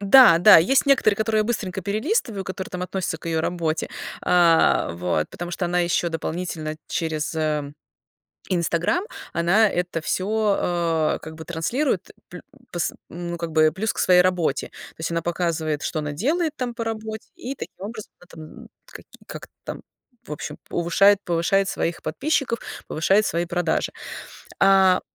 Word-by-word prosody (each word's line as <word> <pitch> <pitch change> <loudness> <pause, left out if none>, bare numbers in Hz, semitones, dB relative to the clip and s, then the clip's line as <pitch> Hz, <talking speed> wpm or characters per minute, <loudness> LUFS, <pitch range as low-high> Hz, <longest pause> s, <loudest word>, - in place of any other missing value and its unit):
Да-да, 205 -4 +8
есть 255 - +3
некоторые, 260 -7 +4
которые 220 0 +1
я - - +1
быстренько 205 -5 -3
перелистываю, 215 - -1
которые 190 0 -6
там 180 0 -5
относятся 185 -2 -3
к - - -11
её 165 -1 0
работе, 165 -1 -2 0.3
а, 170 - +4
вот, 85 -2 -1
потому 175 0 -6
что 175 +1 -3
она 175 +1 +1
еще 175 0 +1
дополнительно 165 -1 -4
через, 160 -1 -2
э, 150 -2 -1 0.8
"Инстаграм", 175 - +1 0.3
она 190 +6 +4
это 175 -2 -2
всё, 210 +4 0 0.6
э, - - -7
как 160 0 -9
бы 160 - -9
транслирует, 195 - -1 0.2
плю 180 - -9 0.3
пс 175 -1 -1 0.2
м, 175 0 -6
ну, 170 - -4
как 165 -1 -5
бы, 155 0 +4
плюс 215 +5 -2
к - - -7
своей 180 -1 +6
работе. 180 -6 0
То - - -14
есть 160 - -3
она 165 0 0
показывает, 165 -3 -1
что 155 - -2
она 150 -1 -3
делает 305 - 0
там 250 -3 -3
по 230 0 -4
работе 220 -1 -5
и, 255 - -5
таким - - -8
образом, 215 0 -8
это, 175 -2 -14
м, 155 0 -11 0.2
как - - -12
и - - -21
как-то - - -9
там, - - -6 0.4
в - - -10
общем, 150 - -6
повышает 190 +4 +4
повышает 175 +3 +1
своих 170 +1 -2
подписчиков, 275 -6 -1 0.3
повышает 195 +6 +2
свои 170 -2 -1
продажи. 175 -1 -1 0.7
А 190 -1 +5
180 Hz, 165 wpm, -23 LUFS, 165-210 Hz, 0.8 s, Да-да